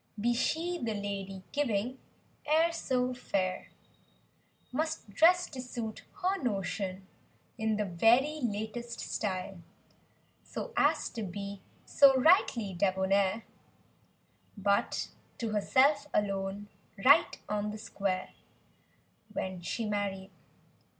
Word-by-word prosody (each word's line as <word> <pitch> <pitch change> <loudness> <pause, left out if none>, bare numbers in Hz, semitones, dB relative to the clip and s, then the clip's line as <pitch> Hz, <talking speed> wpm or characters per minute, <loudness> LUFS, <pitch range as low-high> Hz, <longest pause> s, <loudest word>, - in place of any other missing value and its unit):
Be 240 +3 +2
she, 335 +8 0
the 225 -2 -1
lady 195 -2 -5
giving, 255 -3 -1 0.5
e'er 325 +2 +4
so 255 -6 0
fair; 190 -6 -2 1.0
Must 315 +2 -2
dress 355 - +5
to 260 -3 -5
suit 235 -3 -5 0.2
her 380 +2 +1
notion, 195 -4 -2 0.5
in 220 -2 0
the 210 - 0
very 240 - +3
latest 235 +1 -3
style. 190 -2 -3 0.8
So 485 - -6
as - - +3
to 230 - -6
be 200 0 -6 0.2
so 275 -1 +6
rightly 250 - +4
debonair 190 +3 +1 1.1
But 200 0 +1 0.3
to 230 - -2
herself 280 +7 +3
alone, 200 0 -1 0.4
right 285 +5 +6
on 210 0 -1
the 210 - -5
square— 195 -3 -3 1.0
When 185 -1 -4
she 225 +6 -3
married. 200 -2 -2
215 Hz, 105 wpm, -31 LUFS, 195-260 Hz, 1.1 s, so